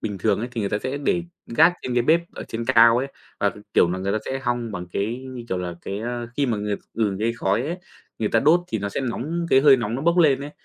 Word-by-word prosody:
bình 105 Hz, -3 st, -4 dB
thường -, -, +1 dB
ấy, 120 Hz, +3 st, -3 dB
thì 115 Hz, -, -3 dB
người 100 Hz, -, -2 dB
ta 105 Hz, -, 0 dB
sẽ 130 Hz, +4 st, -3 dB
để 170 Hz, +5 st, 0 dB, 0.2 s
gác 160 Hz, +9 st, +5 dB
trên 125 Hz, -, -3 dB
cái 120 Hz, -, +3 dB
bếp 160 Hz, +6 st, +4 dB
ở -, -, -6 dB
trên 115 Hz, +1 st, -4 dB
cao 115 Hz, -2 st, +6 dB
ấy, 135 Hz, -, -1 dB, 0.3 s
và, -, -, +2 dB, 0.2 s
kiểu 85 Hz, -, +5 dB
là, 90 Hz, -, -2 dB
người 95 Hz, +1 st, -2 dB
ta 110 Hz, -, +1 dB
sẽ 135 Hz, -, -3 dB
hong 120 Hz, -2 st, -2 dB
bằng 90 Hz, -3 st, -5 dB
cái, 105 Hz, +4 st, -1 dB
như 125 Hz, -2 st, -7 dB
kiểu 95 Hz, -, -1 dB
là, 90 Hz, -1 st, -4 dB
cái, 100 Hz, +1 st, -4 dB
a, 120 Hz, +1 st, -4 dB
khi 140 Hz, -2 st, +1 dB
mà 115 Hz, -3 st, 0 dB
người 105 Hz, 0 st, -2 dB, 0.2 s
ừ, 105 Hz, -4 st, 0 dB
cái 115 Hz, +1 st, +1 dB
khói 115 Hz, 0 st, 0 dB
ấy, 165 Hz, +5 st, -3 dB, 0.4 s
người 110 Hz, -2 st, 0 dB
ta 115 Hz, -, +2 dB
đốt 160 Hz, +5 st, +5 dB
thì 110 Hz, -, -2 dB
nó 100 Hz, -, -3 dB
sẽ 100 Hz, -, -3 dB
nóng, 150 Hz, +7 st, -3 dB
cái 130 Hz, -, +6 dB
hơi 140 Hz, -1 st, +7 dB
nóng 115 Hz, -2 st, -3 dB
nó 135 Hz, -, -3 dB
bốc 170 Hz, +2 st, +2 dB
lên 140 Hz, -5 st, +4 dB
ấy. 145 Hz, -, -6 dB
120 Hz, 290 wpm, -23 LUFS, 105-135 Hz, 0.4 s, hơi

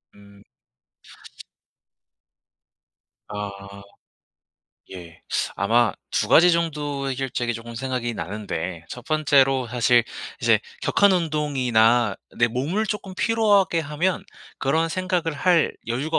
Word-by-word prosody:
음. 100 Hz, 0 st, -18 dB, 2.8 s
아. 105 Hz, -1 st, -5 dB, 1.4 s
예. 85 Hz, -3 st, -11 dB, 0.3 s
아마 115 Hz, +4 st, +2 dB, 0.2 s
2 -, -, 0 dB
가지 175 Hz, +2 st, +7 dB
정도의 145 Hz, -5 st, -1 dB
해결책이 125 Hz, -2 st, -2 dB
쪼금 115 Hz, +1 st, -8 dB
생각이 125 Hz, -1 st, -3 dB
나는데 90 Hz, -3 st, -5 dB
1 125 Hz, -, -9 dB
번째로 135 Hz, -4 st, +2 dB
사실 120 Hz, 0 st, +3 dB, 0.4 s
이제 -, -, +4 dB, 0.2 s
격한 200 Hz, -1 st, +3 dB
운동이나 125 Hz, -, +2 dB, 0.2 s
내 120 Hz, -, +5 dB
몸을 145 Hz, -, -1 dB
쪼끔 200 Hz, -3 st, -5 dB
피로하게 205 Hz, -6 st, +2 dB
하면 160 Hz, +5 st, -1 dB, 0.3 s
그런 160 Hz, +5 st, +1 dB
생각을 180 Hz, -2 st, -1 dB
할 170 Hz, +2 st, +2 dB
여유가 135 Hz, +7 st, -1 dB
135 Hz, 205 characters per minute, -23 LUFS, 115-165 Hz, 2.8 s, 가지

